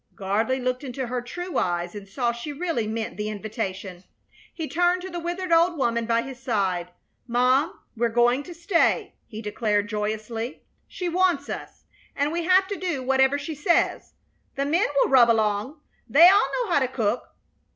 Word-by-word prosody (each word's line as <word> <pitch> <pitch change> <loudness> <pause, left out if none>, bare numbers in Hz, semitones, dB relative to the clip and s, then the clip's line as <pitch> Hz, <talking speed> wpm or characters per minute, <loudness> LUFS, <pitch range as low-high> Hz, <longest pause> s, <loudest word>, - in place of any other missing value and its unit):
Gardley 220 +7 0
looked 255 +1 -2
into 260 -1 -4
her 245 +1 -3
true 355 +9 -4
eyes 175 -1 -1
and 205 -1 -9
saw 240 +3 0
she 235 +5 -6
really 290 -7 -2
meant 220 0 -4
the 210 0 -3
invitation. 195 -4 -5 0.5
He 320 -2 -5
turned 355 +2 +1
to 375 - -6
the 345 - -4
withered 350 +1 -4
old 335 +1 +4
woman 235 -4 0
by 230 0 +2
his 265 -1 -9
side. 190 -7 -1 0.4
"Mom, 255 +4 +2 0.2
we're 235 +1 +1
going 240 +3 +3
to 350 - -8
stay," 340 +1 +1
he 220 0 -8
declared, 210 -1 0
joyously. 215 +3 -4 0.2
"She 360 - -5
wants 350 -5 +1
us, - - -7 0.3
and 285 +2 0
we 340 0 -2
have 375 +2 +4
to 400 - -3
do 340 -8 -2
whatever 265 +2 +3
she 290 +3 -5
says. 310 +4 0 0.4
The 275 0 -1
men 335 +8 +2 0.2
will - - -2
rub 245 -3 +7
along. 220 +5 0 0.3
They 315 +9 +8
all 395 +3 +5
know 425 - -5
how 310 - +4
to 260 - +1
cook. 235 -2 -2
255 Hz, 180 wpm, -25 LUFS, 220-330 Hz, 0.5 s, They